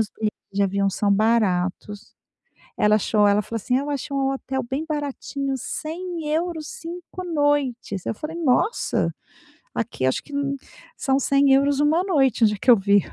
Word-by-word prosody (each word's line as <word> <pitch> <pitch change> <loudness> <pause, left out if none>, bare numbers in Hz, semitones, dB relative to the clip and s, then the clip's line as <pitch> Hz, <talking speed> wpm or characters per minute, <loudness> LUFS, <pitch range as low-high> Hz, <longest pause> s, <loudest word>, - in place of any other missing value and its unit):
os 215 -1 -1
bilhetes 215 -1 -2
de 200 +1 +1
avião 195 0 +1
são 200 +2 0
baratos. 205 -2 0 0.6
Ela 210 0 +4
achou, 210 0 +2
ela 205 +1 +4
falou 230 +3 -7
assim: 250 +4 0
"Eu 285 +2 -2
achei 285 0 -3
um 270 0 +1
hotel 265 0 -3
bem 275 +4 -2
baratinho, 285 -2 -3
€100, 325 +2 -3
5 350 +2 -8
noites." 290 - 0
Eu - - -1
falei: 305 +8 -6
"Nossa!" 285 - +1 0.6
Aqui, 225 - -2
acho 130 - +1
que 290 - -14 0.6
são 270 -2 +1
€100 275 +1 +3
uma 310 +4 +3
noite, 270 - +2
onde 210 -1 +4
é - - -9
que - - +1
eu 245 - +10
vi. 200 +1 +4
270 Hz, 160 wpm, -23 LUFS, 210-300 Hz, 0.6 s, eu